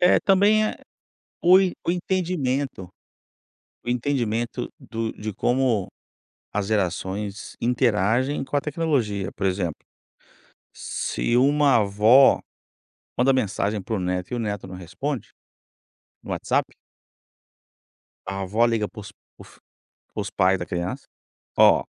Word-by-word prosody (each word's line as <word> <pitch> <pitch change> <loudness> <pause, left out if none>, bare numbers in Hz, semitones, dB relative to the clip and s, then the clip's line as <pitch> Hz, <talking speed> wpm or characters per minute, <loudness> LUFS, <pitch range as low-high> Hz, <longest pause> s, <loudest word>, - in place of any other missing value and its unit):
É, 180 - +5
também 205 +3 +4
é - - -4 0.7
o 185 +2 +7
en 185 -2 +1
o - - +3
entendimento 155 - -1 1.0
o - - -7
entendimento 120 -2 -1
do 115 -1 -4
de 110 0 -6
como 120 -2 +1 0.7
as 100 -1 -1
gerações 100 0 -2
interagem 120 +2 +1
com 135 +2 -5
a 140 - +1
tecnologia. 140 - -1
Por 100 - -4
exemplo, 90 -4 -2 0.9
se 60 - -2
uma 140 +1 +4
avó, 110 +5 +5 0.8
manda 130 +2 +4
mensagem 105 -4 0
para 105 +4 -4
o 100 - -1
neto 90 +1 -2
e - - 0
o - - -2
neto 105 -4 -3
não 95 - -9
responde, 95 - -5 1.0
no - - -11
WhatsApp - - -1 1.5
a 95 0 -4
avó 105 +5 +1
liga 115 -3 0
para 110 - -10
os 105 -1 -10
para - - -62
os - - -19 0.6
para - - -2
os - - -6
pais 95 +1 +2
da 90 - -5
criança: 90 +10 -4 0.5
"Ó, - - +6
115 Hz, 130 wpm, -24 LUFS, 100-135 Hz, 1.5 s, o